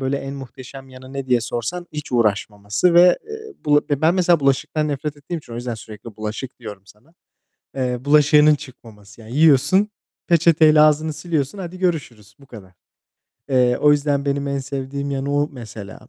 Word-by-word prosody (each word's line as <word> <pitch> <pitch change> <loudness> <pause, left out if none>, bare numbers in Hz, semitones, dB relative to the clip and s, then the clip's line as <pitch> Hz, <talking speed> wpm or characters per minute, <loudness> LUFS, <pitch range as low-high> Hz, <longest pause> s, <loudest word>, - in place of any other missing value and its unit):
böyle, 135 +1 -1
en 135 0 -6
muhteşem 135 0 -11
yanı 130 +1 -13
ne 135 -1 -5
diye 125 -2 +2
sorsan: 120 +10 -4
hiç 150 -3 -7
uğraşmaması 105 - 0
ve, 175 +1 +6
eee, 440 -1 -9
bula 145 0 +4
ben 160 +5 +2
mesela 175 -3 +3
bulaşıktan 140 +3 0
nefret 145 +1 -4
ettiğim 160 +4 -6
için 120 -6 -14
o - - -6
yüzden 120 -1 -4
sürekli 110 0 -11
bulaşık 110 +4 -6
diyorum 105 -5 -9
sana, 105 - -21 0.6
eee, 125 -2 -1
bulaşığının 150 +1 +5
çıkmaması. 115 -7 -14
Yani, 115 +4 -9
yiyorsun, 160 +7 +4 0.4
peçeteyle 160 -2 +5
ağzını 155 +1 +3
siliyorsun. 155 0 -3
Hadi 185 -1 -7
görüşürüz. 130 - -3
Bu 140 - -18
kadar. 100 -7 -13 0.8
Eee, 125 -2 +3
o 150 - +5
yüzden 145 -1 0
benim 140 0 -1
en 140 0 -2
sevdiğim 140 +1 -5
yanı, 140 +1 -2
o 145 +1 +1
mesela. 110 -5 -10
140 Hz, 170 wpm, -20 LUFS, 120-150 Hz, 0.8 s, ve